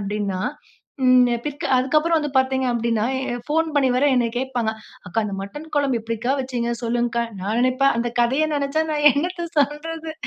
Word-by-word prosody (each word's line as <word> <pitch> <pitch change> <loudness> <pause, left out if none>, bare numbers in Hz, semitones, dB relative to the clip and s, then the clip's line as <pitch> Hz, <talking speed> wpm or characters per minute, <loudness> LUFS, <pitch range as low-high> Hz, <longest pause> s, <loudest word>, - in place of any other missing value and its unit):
அப்படீன்னா, 200 -2 -2 0.6
ம் 255 -1 +6 0.2
பிக்க 290 -1 -5
அதுக்கப்புறம் 305 +6 +2
வந்து 295 -1 -3
பாத்தீங்க 260 0 +1
அப்படின்னா, 230 -2 0 0.3
அ - - -2
ஃபோன் 320 +2 +1
பண்ணி 280 -2 +3
வேற 260 - +2
என்னைய 240 -2 +1
கேட்பாங்க. 250 -4 -1 0.4
"அக்கா 200 +5 -1
அந்த 205 -2 -4
மட்டன் 295 +11 -8
குழம்பு 275 -4 +2
எப்பிடிக்கா 230 +3 -2
வச்சிங்க? 245 -2 -2
சொல்லுங்கக்கா." 235 0 0 0.2
நான் 210 +5 -1
நினைப்பேன் 255 +2 +3
அந்த 240 +1 -1
கதய 265 +6 +2
நினைச்சா 285 +2 0
நான் 295 -1 +1
என்னத்த 345 +4 -2
சொல்றது! 315 +3 -1
255 Hz, 165 wpm, -22 LUFS, 235-295 Hz, 0.6 s, ம்